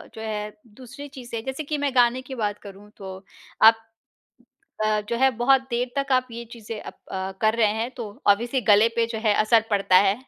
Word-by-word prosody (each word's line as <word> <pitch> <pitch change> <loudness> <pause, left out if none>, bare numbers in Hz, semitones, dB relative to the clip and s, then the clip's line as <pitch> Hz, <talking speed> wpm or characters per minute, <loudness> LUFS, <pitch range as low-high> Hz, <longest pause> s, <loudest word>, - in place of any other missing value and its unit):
जो 220 - -8
है 210 -1 -4 0.2
दूसरी 275 +4 -10
चीज़ 255 -3 -11
से 230 - -3
जैसे 265 +5 -5
कि 300 +1 -3
मैं 285 -2 -1
गाने 245 +1 +3
की 260 0 -9
बात 210 -3 -2
करूँ 200 +1 -12
तो 190 -1 -8 0.5
आप 225 0 +5 1.0
अ, 215 0 +1
जो 235 - -1
है 265 +2 +4
बहुत 255 +3 +3
देर 245 +1 -1
तक 275 -1 -1
आप 255 0 +2
ये 235 +1 -7
चीज़ें 225 -2 -8
अप - - -10 0.2
अ, 190 0 -3
कर 220 0 +3
रहे 225 - +4
हैं 225 +3 -3
तो 235 -3 -5 0.2
ऑब्वियसली 235 +6 +2
गले 210 +3 +6
पे 230 0 +2
जो 225 -1 -5
है 210 -1 +4
असर 225 +1 +4
पड़ता 195 -2 +3
है। 195 +1 +5
230 Hz, 215 wpm, -24 LUFS, 210-255 Hz, 1.0 s, गले